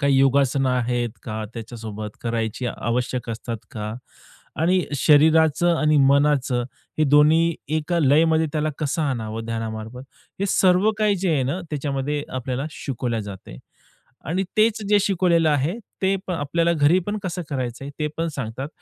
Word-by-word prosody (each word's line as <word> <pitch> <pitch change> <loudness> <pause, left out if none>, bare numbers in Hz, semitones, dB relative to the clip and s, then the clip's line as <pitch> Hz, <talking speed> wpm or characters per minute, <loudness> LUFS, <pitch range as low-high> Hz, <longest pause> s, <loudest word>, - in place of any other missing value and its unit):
काही 140 -2 +3
योगासनं 135 0 +3
आहेत 120 -1 0
का 110 -2 -4
त्याच्यासोबत? 110 -2 -7
करायची 115 +1 -2
आवश्यक 120 +1 -2
असतात 115 +1 -4
का? 105 -3 -5 0.7
आणि 180 +2 +2
शरीराचं 160 +3 +4
आणि 155 -1 +2
मनाचं 140 -2 +3 0.4
हे 155 - +4
दोन्ही 155 +4 +4 0.2
एका 160 +3 -1
लयमध्ये 160 +2 +4
त्याला 155 0 0
कसं 155 +1 -1
आणावं 115 -5 -3
ध्यानामार्फत? 115 +1 -5 0.4
हे 200 - +1
सर्व 185 +3 +4
काही 210 -2 +2
जे 185 0 -1
आहे 140 - +1
ना, 140 +8 -2
त्याच्यामध्ये 145 0 -2
आपल्याला 130 +2 -3
शिकवल्या 120 -6 -3
जाते. 100 - -9 0.7
आणि 175 +6 0
तेच 220 +1 +3
जे 210 0 +5
शिकवलेलं 175 -4 +2
आहे, 145 +2 +1 0.3
ते 190 +1 +3
पण 180 - -2
आपल्याला 165 +3 0
घरी 155 +2 +4
पण 210 +1 -2
कसं 180 -2 -3
करायचं 130 -2 -3
आहे, 140 - -6
ते 150 - 0
पण 165 +1 -1
सांगतात. 130 +2 -4
140 Hz, 150 wpm, -23 LUFS, 120-165 Hz, 0.7 s, जे